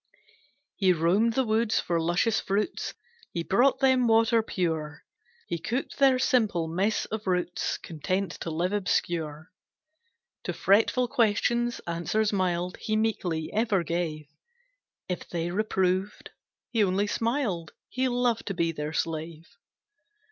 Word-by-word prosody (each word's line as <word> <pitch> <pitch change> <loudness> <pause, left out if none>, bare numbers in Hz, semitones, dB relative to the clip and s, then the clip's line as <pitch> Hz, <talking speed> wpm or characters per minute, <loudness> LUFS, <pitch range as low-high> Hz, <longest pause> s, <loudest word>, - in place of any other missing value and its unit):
He 190 -3 +4
roamed 185 +8 +2
the 265 - +2
woods 220 0 +2
for 170 -1 0
luscious 175 +7 +1
fruits, 200 +2 -2 0.4
He 170 - -2
brought 245 +10 +3
them 260 -2 +4
water 225 0 +4
pure, 160 -7 -3 0.4
He 170 - -3
cooked 245 - -3
their 270 -2 +5
simple 215 -10 +2
mess 190 +6 0
of 215 -2 -5
roots, 180 -1 -1
Content 185 +4 -3
to - - -4
live 175 +4 -1
obscure. 170 -5 -1 0.9
To - - -2
fretful 225 +5 +3
questions, 240 0 +1
answers 190 +6 0
mild 180 -2 0
He 215 - -2
meekly 185 -8 -1
ever 215 -4 +1
gave, 165 -2 -2 0.8
If 180 - -5
they 170 0 -2
reproved, 190 -1 -1 0.4
he 225 -3 +3
only 195 +1 +1
smiled, 215 - -1
He 260 +1 -1
loved 245 -2 0
to 195 - -2
be 165 -1 +1
their 150 -1 -5
slave. 160 0 -4
195 Hz, 130 wpm, -27 LUFS, 170-225 Hz, 0.9 s, their